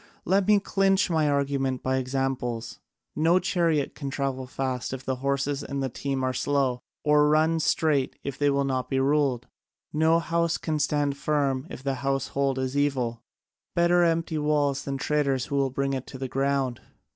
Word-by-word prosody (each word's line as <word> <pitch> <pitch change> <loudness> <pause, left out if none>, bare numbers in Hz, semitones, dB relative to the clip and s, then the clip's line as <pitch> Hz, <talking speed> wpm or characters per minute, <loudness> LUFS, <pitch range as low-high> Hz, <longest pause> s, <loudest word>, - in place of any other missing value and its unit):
Let 195 +1 +2
me 210 -1 +6
clinch 195 -1 +2
my 155 -2 +2
argument 140 -2 0
by 130 0 +1
examples: 130 -3 -2 0.4
no 165 +3 +4
chariot 170 -5 +1
can 140 -2 -5
travel 135 -2 -3
fast 130 -2 -3
if 130 0 -6
the 130 -1 -1
horses 140 +1 -1
in 140 -1 -4
the 135 - -1
team 135 +2 -3
are 130 0 0
slow, 135 -3 0 0.2
or 150 0 +4
run 160 +2 +3
straight 150 -4 +1
if 140 -2 -4
they 145 +1 +2
will 140 0 +1
not 130 -2 -2
be 135 - +1
ruled; 135 -3 +1 0.5
no 160 +2 +4
house 170 0 0
can 155 -2 -2
stand 145 -1 0
firm 140 -3 0
if 130 - -9
the 135 -1 0
household 135 0 0
is 130 +1 -2
evil: 130 -5 0 0.5
better 175 +1 +4
empty 165 -1 +1
walls 145 -2 +1
than 140 -1 -2
traitors 140 -3 0
who 140 - -4
will 135 -1 +2
bring 135 +1 -1
it 130 -1 -4
to 130 - -8
the 130 0 -4
ground. 135 -2 -1
140 Hz, 180 wpm, -26 LUFS, 130-150 Hz, 0.5 s, me